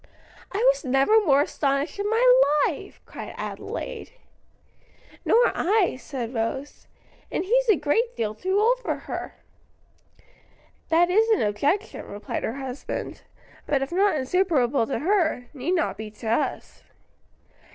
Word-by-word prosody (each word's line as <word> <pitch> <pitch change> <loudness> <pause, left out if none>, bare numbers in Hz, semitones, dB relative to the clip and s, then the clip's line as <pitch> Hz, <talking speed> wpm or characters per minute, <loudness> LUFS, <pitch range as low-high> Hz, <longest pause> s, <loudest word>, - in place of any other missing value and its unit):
"I 390 - -3 0.2
was - - -11
never 275 - +3
more 280 -1 +5
astonished 285 +4 -1
in 405 +1 -1
my 455 +3 +2 0.4
life!" - - -5
cried - - -9
Adelaide. - - -6 1.1
"Nor 480 +1 +4
I," 395 -2 +2
said 255 -4 -6
Rose. 250 +5 -4 0.4
"And - - -2
he's - - +2
a 425 - +7
great 460 +11 0
deal 215 -2 -1
too 375 - -1
old 480 +4 +3
for - - -2
her." - - -6 1.5
"That 345 +2 +3
is 440 +4 +3
an 440 - +3
objection," 280 - -1
replied 205 +1 -5
her 225 - -2
husband, 265 -1 -6 0.5
"but 275 -2 +1
if 270 - -6
not 390 +1 +2
insuperable 280 -5 +1
to - - -2
her, 325 -7 +1
need 300 +6 -2
not 335 - -1
be 220 -1 -6
to 215 +1 -10
us." 230 - -2
315 Hz, 140 wpm, -25 LUFS, 265-410 Hz, 1.5 s, a